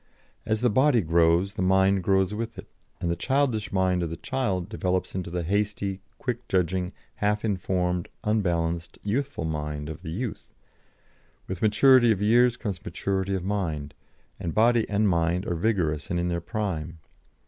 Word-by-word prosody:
As 110 0 0
the 125 - +4
body 130 +1 +4
grows, 85 +3 +3
the 95 - -4
mind 95 +1 +3
grows 95 +1 +2
with 115 +2 -4
it, - - -8 0.3
and 85 - -1
the - - 0
childish 130 0 0
mind 95 -2 +2
of 85 - -2
the 85 - -5
child 100 -10 -2
develops 95 -3 -1
into 90 -2 -3
the 90 0 -2
hasty, 100 +1 -1 0.2
quickly 125 -2 -3
judging, 90 0 0 0.3
half 105 +1 0
informed, 90 -3 -1
unbalanced 85 -5 0
youthful 120 -2 -2
mind 75 -1 -3
of 80 - -7
the - - -7
youth; 110 +7 -5 0.9
with 95 -2 -5
maturity 120 +3 +6
of 105 - +1
years 120 +3 +4
comes 100 -6 -4
maturity 95 +2 -2
of 95 - -3
mind, 80 -8 -2 0.5
and 85 - -4
body 115 +1 +3
and 105 +1 +2
mind 85 0 +1
are - - -1
vigorous 85 -5 0
and 85 - 0
in 90 0 0
their 85 -1 -1
prime. 85 -6 -3
95 Hz, 165 wpm, -26 LUFS, 85-110 Hz, 0.9 s, maturity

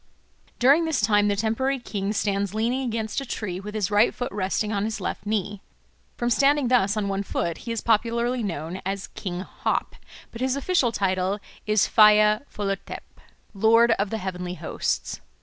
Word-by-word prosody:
During 280 +7 +5
this 320 -1 0
time 205 -1 +3
the 205 - +1
temporary 225 +6 0
king 205 -5 -3
stands 200 -1 -1
leaning 235 +4 0
against 225 0 -2
a - - -4
tree 190 -6 -4
with 210 +2 -8
his 210 -2 -1
right 205 +3 +3
foot 245 - -4
resting 205 +2 -1
on 200 -1 0
his 220 -1 -3
left 195 - -5
knee. 205 -1 -2 0.6
From 240 0 -1
standing 280 0 +3
thus 215 -4 +3
on 205 -1 -1
one 195 0 -1
foot 170 -4 -3
he - - -1
is 230 - -2
popularly 235 +2 +1
known 170 -2 -4
as 195 +1 -4
King 180 -2 -5
Hop; - - -3 0.4
but 230 - -9
his 260 0 +1
official 280 -4 +1
title 190 -1 0 0.3
is 215 -1 +3
Phaya 215 0 +6
Phollathep 195 -1 -5 0.3
"Lord 225 +3 +4
of 200 0 0
the 225 - -2
Heavenly 180 -2 -5
Hosts." - - -3
210 Hz, 175 wpm, -25 LUFS, 195-235 Hz, 0.6 s, Phaya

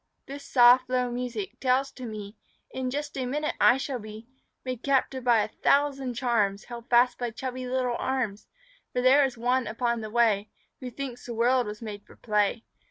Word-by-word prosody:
This 280 +1 -8
soft 250 0 +5
low 250 -1 0
music 240 -3 -5
tells 265 +1 +1
to 255 -2 -8
me 210 -1 -7 0.4
In 260 -1 -3
just 290 +3 -4
a 255 - -2
minute 300 +4 -1
I 245 - +6
shall 270 -2 -4
be 215 +1 -10 0.4
Made 255 -2 -4
captive 265 -1 0
by 235 -3 +4
a - - -3
thousand 275 +1 +1
charms, 220 -5 0
Held 235 -1 -10
fast 245 +1 +4
by 245 -1 -2
chubby 255 +2 -5
little 250 -1 -1
arms, 245 -6 -2 0.5
For 250 - 0
there 270 +3 +6
is 260 -3 -1
one 250 +2 +1
upon 235 +1 -1
the 215 - -6
way 215 -3 +2 0.3
Who 255 - -6
thinks 250 -1 -7
the 235 - -5
world 245 +1 +2
was 210 +2 -7
made 205 -2 -7
for - - -18
play. 210 +1 0
245 Hz, 190 wpm, -27 LUFS, 225-260 Hz, 0.5 s, I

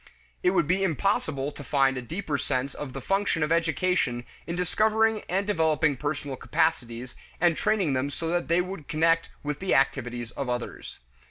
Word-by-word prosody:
It - - +4
would 180 -4 +2
be 185 +3 +2
impossible 160 -5 0
to 145 - -9
find 135 -1 +2
a 125 - -3
deeper 150 - -3
sense 130 +3 -1
of 140 -3 -6
the 135 - -5
function 195 -1 +1
of 150 - -1
education 165 -6 +1 0.2
in 170 - -2
discovering 215 +5 +2
and 195 +3 +1
developing 160 -6 +2
personal 145 0 -3
capacities, 120 0 -1 0.3
and 170 -1 +4
training 195 -8 +1
them 130 +2 0
so 165 +3 -4
that 175 +1 0
they 170 +2 +3
would 180 -5 -6
connect 165 +1 +2
with 150 -1 -3
the 190 - +1
activities 125 -3 0
of 135 -1 -4
others. 120 -1 -4
155 Hz, 175 wpm, -27 LUFS, 135-180 Hz, 0.3 s, It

